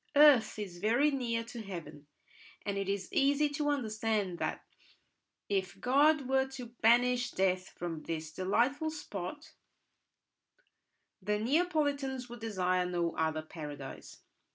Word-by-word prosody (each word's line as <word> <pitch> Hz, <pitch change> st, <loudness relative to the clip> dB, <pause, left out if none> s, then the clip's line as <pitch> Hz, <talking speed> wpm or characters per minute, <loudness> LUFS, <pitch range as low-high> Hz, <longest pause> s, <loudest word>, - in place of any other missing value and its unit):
Earth 285 Hz, -7 st, +6 dB
is 190 Hz, -5 st, -6 dB
very 240 Hz, +9 st, +3 dB
near 235 Hz, -4 st, -1 dB
to 230 Hz, 0 st, -8 dB
heaven, 170 Hz, -7 st, -8 dB, 0.6 s
and 200 Hz, -1 st, -1 dB
it 195 Hz, -1 st, -2 dB
is 195 Hz, -2 st, -3 dB
easy 285 Hz, +2 st, +3 dB
to 290 Hz, 0 st, -1 dB
understand 220 Hz, -8 st, -1 dB
that, -, -, -3 dB, 0.8 s
if 190 Hz, -2 st, -1 dB
God 280 Hz, +3 st, +4 dB
were 265 Hz, 0 st, +2 dB
to 255 Hz, -2 st, -6 dB, 0.2 s
banish 245 Hz, +2 st, +4 dB
death 185 Hz, -2 st, 0 dB
from 170 Hz, -3 st, -5 dB
this 160 Hz, -1 st, -4 dB
delightful 240 Hz, -, +1 dB
spot, 295 Hz, -, -7 dB, 1.7 s
the 210 Hz, +2 st, 0 dB
Neapolitans 280 Hz, -1 st, 0 dB
would 240 Hz, 0 st, -8 dB
desire 185 Hz, -5 st, 0 dB
no 175 Hz, -2 st, -1 dB
other 160 Hz, -1 st, 0 dB
paradise. 145 Hz, -4 st, -9 dB
220 Hz, 125 wpm, -32 LUFS, 185-270 Hz, 1.7 s, Earth